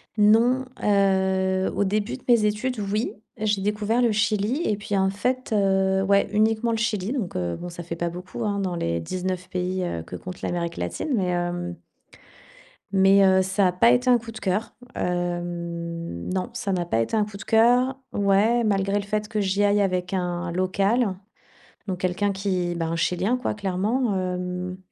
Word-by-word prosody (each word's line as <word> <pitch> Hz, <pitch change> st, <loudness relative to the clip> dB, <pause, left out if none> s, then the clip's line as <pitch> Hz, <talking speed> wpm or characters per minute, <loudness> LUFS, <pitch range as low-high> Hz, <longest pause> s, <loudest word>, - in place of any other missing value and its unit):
Non, 230 Hz, +5 st, +4 dB, 0.2 s
heu, 190 Hz, -2 st, +2 dB
au -, -, +2 dB
début 210 Hz, +5 st, -1 dB
de -, -, -21 dB
mes 235 Hz, -3 st, +4 dB
études, 220 Hz, +3 st, -1 dB
oui, 210 Hz, +3 st, -1 dB, 0.2 s
j'ai 210 Hz, -2 st, 0 dB
découvert 210 Hz, +3 st, 0 dB
le 235 Hz, -2 st, +3 dB
Chili 210 Hz, +6 st, +1 dB
et 210 Hz, -, +1 dB
puis, 205 Hz, 0 st, -3 dB
en 190 Hz, 0 st, +2 dB
fait, 250 Hz, +6 st, -2 dB
heu 190 Hz, -1 st, +2 dB
ouais, 200 Hz, +1 st, +3 dB
uniquement 220 Hz, +2 st, +2 dB
le 225 Hz, -, 0 dB
Chili. 215 Hz, -2 st, -1 dB
Donc, 225 Hz, -10 st, -3 dB
heu, 85 Hz, -1 st, -1 dB
bon, 175 Hz, -, -7 dB
ça 175 Hz, 0 st, -8 dB
fait 170 Hz, 0 st, -5 dB
pas 170 Hz, +1 st, -2 dB
beaucoup, 180 Hz, +6 st, -7 dB
hein, 205 Hz, -2 st, -1 dB
dans 185 Hz, -3 st, -2 dB
les 85 Hz, -, -1 dB
19 185 Hz, -, -4 dB
pays, 185 Hz, 0 st, -2 dB
heu, 85 Hz, -, -3 dB
que -, -, -8 dB
compte 180 Hz, -1 st, -8 dB
l'Amérique 170 Hz, -1 st, -3 dB
latine. 90 Hz, -, -3 dB
Mais, 195 Hz, -5 st, +1 dB
hem 175 Hz, 0 st, -2 dB, 1.2 s
mais, 195 Hz, +1 st, +5 dB
heu, 190 Hz, 0 st, +5 dB
ça 195 Hz, +1 st, +2 dB
a -, -, +2 dB
pas 230 Hz, +6 st, +5 dB
été 250 Hz, +1 st, +2 dB
un 245 Hz, -, +6 dB
coup 230 Hz, 0 st, -9 dB
de 220 Hz, -, -9 dB
cœur. 200 Hz, +4 st, -1 dB, 0.2 s
Hem, 170 Hz, -, -3 dB
non, 190 Hz, +4 st, -2 dB
ça 210 Hz, -4 st, -3 dB
n'a 180 Hz, -2 st, 0 dB
pas 115 Hz, -9 st, +1 dB
été 165 Hz, -, -1 dB
un 210 Hz, -, +2 dB
coup 210 Hz, -1 st, -11 dB
de 210 Hz, -, -8 dB
cœur 245 Hz, +4 st, +3 dB, 0.2 s
ouais, 205 Hz, +4 st, +3 dB
malgré 200 Hz, -1 st, +1 dB
le 205 Hz, -, -2 dB
fait 210 Hz, +1 st, -2 dB
que 215 Hz, -1 st, -1 dB
j'y 195 Hz, +1 st, +1 dB
aille 205 Hz, 0 st, +3 dB
avec 185 Hz, -1 st, -1 dB
un 175 Hz, -1 st, -2 dB
local, 195 Hz, +4 st, +1 dB, 0.7 s
donc 185 Hz, -3 st, -3 dB
quelqu'un 185 Hz, +3 st, 0 dB
qui, 185 Hz, -3 st, -1 dB
ben, 165 Hz, -1 st, -2 dB
un -, -, -1 dB
chilien 180 Hz, +7 st, +1 dB
quoi, 250 Hz, -, -2 dB
clairement, 210 Hz, +4 st, 0 dB
hem. 180 Hz, 0 st, -3 dB
195 Hz, 190 wpm, -24 LUFS, 180-215 Hz, 1.2 s, un